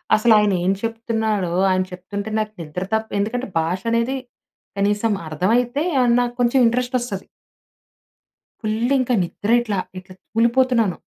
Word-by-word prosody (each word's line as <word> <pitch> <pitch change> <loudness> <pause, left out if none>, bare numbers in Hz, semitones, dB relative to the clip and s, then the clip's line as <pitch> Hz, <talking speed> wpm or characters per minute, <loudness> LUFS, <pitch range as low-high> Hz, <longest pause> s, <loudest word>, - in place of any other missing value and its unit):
అసలు 220 +1 +4
ఆయన 210 -2 +3
ఏం 190 - +3
చెప్తున్నాడో 220 -5 -1 0.2
ఆయన 185 0 +2
చెప్తుంటే 200 +3 -6
నాకు 215 0 -2
నిద్ర 165 +4 -5
తప్ప 220 0 0
ఎందుకంటే 235 +5 -2
భాష 175 +4 -1
అనేది 230 +3 +1 0.6
కనీసం 205 +2 +1 0.2
అర్థమైతే 235 - +1 0.2
ఏమన్నా 245 -1 +4 0.2
కొంచెం 245 +2 +3
ఇంట్రెస్ట్ 245 +2 0
వస్తది. 210 -6 -5 1.4
ఫుల్ 220 +4 0
ఇంకా 250 0 0
నిద్ర 185 +5 -5
ఇట్లా, 210 -4 -2 0.2
ఇట్లా 185 0 -14 0.2
తూలిపోతున్నాను. 235 -3 +2
220 Hz, 130 wpm, -21 LUFS, 195-240 Hz, 1.4 s, అసలు